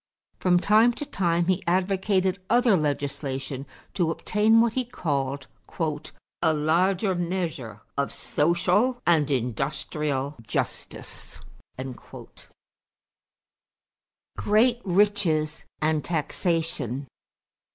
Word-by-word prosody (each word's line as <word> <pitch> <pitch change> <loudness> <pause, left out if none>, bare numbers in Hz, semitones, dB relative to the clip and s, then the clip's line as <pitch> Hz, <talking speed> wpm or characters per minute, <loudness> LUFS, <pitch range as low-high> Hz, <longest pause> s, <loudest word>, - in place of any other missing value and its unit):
From 180 -1 +3
time 220 +5 +5
to 295 - -5
time 170 -7 +1
he 185 +1 +1
advocated 190 +1 +1
other 240 -3 +4
legislation 140 -3 -2 0.3
to 175 -4 +1
obtain 215 +6 +3
what 230 -1 +3
he 255 - 0
called 140 - -2 1.0
"a 160 -2 +4
larger 180 +6 +2
measure 170 - -3 0.2
of 140 - 0
social 180 - +1
and 155 -4 +3
industrial 140 +2 -2
justice." 110 - -5 3.0
=Great 235 +4 +3
Riches 180 -6 +1 0.2
and 155 -1 +1
Taxation. 160 - -1
170 Hz, 85 wpm, -26 LUFS, 145-195 Hz, 3.0 s, time